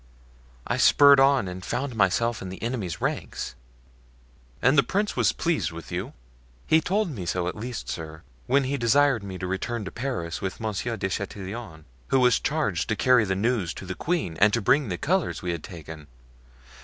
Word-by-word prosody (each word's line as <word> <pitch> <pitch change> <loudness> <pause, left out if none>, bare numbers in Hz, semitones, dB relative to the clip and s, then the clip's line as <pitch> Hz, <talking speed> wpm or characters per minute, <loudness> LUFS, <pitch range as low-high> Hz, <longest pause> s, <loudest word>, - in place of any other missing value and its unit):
I - - -1
spurred 140 -1 +7
on 135 -5 +4
and 90 0 -7
found 130 +4 -3
myself 110 +3 +1
in 95 - -6
the 95 - -8
enemy's 115 -8 -3
ranks." - - -3 1.1
"And 130 +3 +4
the 140 - +7
prince 200 - -1
was - - +3
pleased 165 - -1
with 85 0 -9
you?" - - -4 0.5
"He 160 +1 +4
told 195 +1 0
me 95 -10 -6
so, 90 +1 -1
at 90 - -2
least, 120 +2 -6
sir, 80 0 -6 0.2
when 140 +1 +3
he 135 +2 -1
desired 135 0 +3
me 95 -2 -6
to 90 - -4
return 100 +4 -3
to 95 - -6
Paris 115 -11 -4
with 95 -2 -4
Monsieur 110 +2 -3
de 95 - -1
Chatillon, 95 -3 -6 0.2
who 135 - +3
was 125 -2 +4
charged 145 - -1
to 110 - +1
carry 125 -1 +4
the 95 -1 -1
news 105 -4 0
to - - -8
the 95 - -4
queen 150 - -2
and 105 +3 +5
to 115 - +2
bring 130 +4 +2
the 90 - -2
colors 175 - -1
we 90 - -1
had 85 -3 -5
taken. 80 -3 -10
110 Hz, 190 wpm, -26 LUFS, 90-135 Hz, 1.1 s, spurred